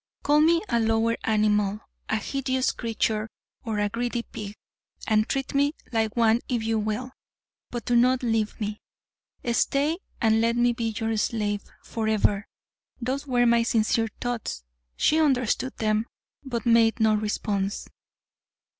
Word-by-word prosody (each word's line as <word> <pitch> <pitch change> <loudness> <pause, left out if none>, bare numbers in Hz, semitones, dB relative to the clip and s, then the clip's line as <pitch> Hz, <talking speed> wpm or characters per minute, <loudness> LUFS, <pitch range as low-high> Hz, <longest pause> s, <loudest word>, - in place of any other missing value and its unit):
"Call 295 +1 +4
me 330 +3 +4
a 235 - +1
lower 225 +1 +2
animal, 210 -1 +2 0.3
a - - +2
hideous 260 +2 0
creature 220 -2 -1 0.3
or 225 -3 -3
a 205 0 +1
greedy 235 +2 -2
pig, 210 -2 -8 0.5
and 215 0 +2
treat 270 -1 -2
me 285 +1 +2 0.2
like 220 -1 0
one 230 0 +4
if 240 -3 0
you 225 0 0
will, 215 +4 -3 0.6
but 240 -2 -5
do 245 - +1
not 255 +2 +4
leave 225 -2 0
me. 210 0 -4 0.7
Stay 290 +7 +1 0.2
and 225 -1 +3
let 230 +1 +2
me 240 0 +3
be 235 -1 -3
your 225 0 -1
slave 210 -2 -1 0.2
forever." 215 -2 0 0.5
Those 265 +4 -3
were 245 -2 +3
my 235 0 +4
sincere 225 0 +1
thoughts. 235 - -3 0.3
She 315 - +3
understood 260 -3 +1
them, 215 +1 0 0.4
but 250 -3 -4
made 230 0 +4
no 220 -1 +4
response. 210 -1 -2
230 Hz, 145 wpm, -26 LUFS, 215-245 Hz, 0.7 s, Call